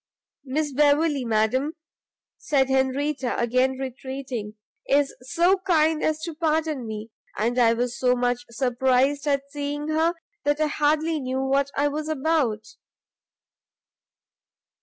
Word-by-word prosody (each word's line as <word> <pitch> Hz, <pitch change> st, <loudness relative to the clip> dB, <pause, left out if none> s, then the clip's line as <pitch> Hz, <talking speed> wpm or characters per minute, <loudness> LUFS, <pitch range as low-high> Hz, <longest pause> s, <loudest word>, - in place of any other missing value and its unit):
"Miss 290 Hz, +2 st, -2 dB
Beverley, 295 Hz, 0 st, +3 dB
madam," 240 Hz, +7 st, +1 dB, 0.6 s
said 270 Hz, -3 st, +1 dB
Henrietta, 265 Hz, 0 st, 0 dB
again 255 Hz, +2 st, +2 dB
retreating, 260 Hz, -4 st, -5 dB, 0.3 s
"is 280 Hz, 0 st, +2 dB
so 345 Hz, +8 st, +2 dB
kind 320 Hz, -4 st, +2 dB
as 310 Hz, 0 st, 0 dB
to 335 Hz, -, -4 dB
pardon 310 Hz, -5 st, -1 dB
me, 215 Hz, +1 st, -6 dB, 0.3 s
and 235 Hz, +4 st, 0 dB
I 230 Hz, -1 st, +5 dB
was 245 Hz, +1 st, -2 dB
so 250 Hz, -1 st, +3 dB
much 245 Hz, 0 st, 0 dB
surprised 260 Hz, +3 st, +1 dB
at 280 Hz, -1 st, +1 dB
seeing 290 Hz, +1 st, -4 dB
her, 320 Hz, +2 st, +2 dB, 0.3 s
that 290 Hz, +1 st, +1 dB
I 310 Hz, -, +3 dB
hardly 305 Hz, +2 st, +1 dB
knew 260 Hz, 0 st, -2 dB
what 275 Hz, +1 st, +1 dB
I 285 Hz, +1 st, +3 dB
was 305 Hz, +2 st, -3 dB
about." 285 Hz, -7 st, 0 dB
275 Hz, 125 wpm, -24 LUFS, 250-305 Hz, 0.6 s, I